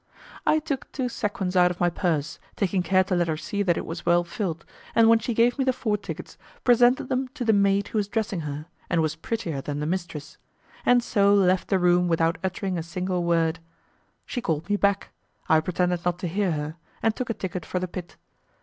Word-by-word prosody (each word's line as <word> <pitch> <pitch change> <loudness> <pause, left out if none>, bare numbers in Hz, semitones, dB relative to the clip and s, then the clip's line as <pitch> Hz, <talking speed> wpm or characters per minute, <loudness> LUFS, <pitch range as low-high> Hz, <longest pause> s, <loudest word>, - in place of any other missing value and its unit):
I 310 - +5
took 300 -4 -4
two 255 -2 -2
sequins 200 -5 -2
out 180 -1 +6
of 180 - -5
my 175 0 +2
purse, 165 -4 -1 0.2
taking 190 -1 0
care 185 +1 +3
to 185 0 -1
let 175 -1 +1
her 160 -1 -1
see 200 +5 -3
that 175 -4 +2
it - - -3
was 165 - -6
well 175 0 +3
filled, 170 -2 -4 0.3
and 225 -1 +6
when 225 0 +6
she 230 +1 -3
gave 240 +4 +3
me - - +3
the 260 - +3
four 220 -4 -1
tickets, 205 - -7 0.2
presented 245 +1 +4
them 260 +1 -1
to 255 -5 -3
the 225 - +4
maid 200 0 +2
who 220 - 0
was 200 - -1
dressing 210 -3 -2
her 150 -1 -5 0.2
and 165 -2 +2
was 155 0 -1
prettier 165 -5 -3
than 145 +1 -4
the 150 - -2
mistress, 170 -3 -4 0.5
and 245 -1 +5
so 200 -3 +3
left 185 -2 +3
the 195 - +2
room 180 0 +3
without 165 +1 +1
uttering 185 -1 -2
a - - -2
single 180 +2 -2
word. 165 -1 +1 0.7
She 245 - -4
called 160 -6 -2
me - - +4
back; 200 -1 +1 0.4
I 160 - +5
pretended 180 +1 -1
not 175 -1 0
to 180 - -3
hear 190 +2 0
her, 150 +2 -4 0.3
and 225 -1 +2
took 255 - -4
a 230 - -1
ticket 180 -3 -4
for 180 - -4
the 185 0 -1
pit. 175 0 -8
185 Hz, 220 wpm, -25 LUFS, 170-210 Hz, 0.7 s, out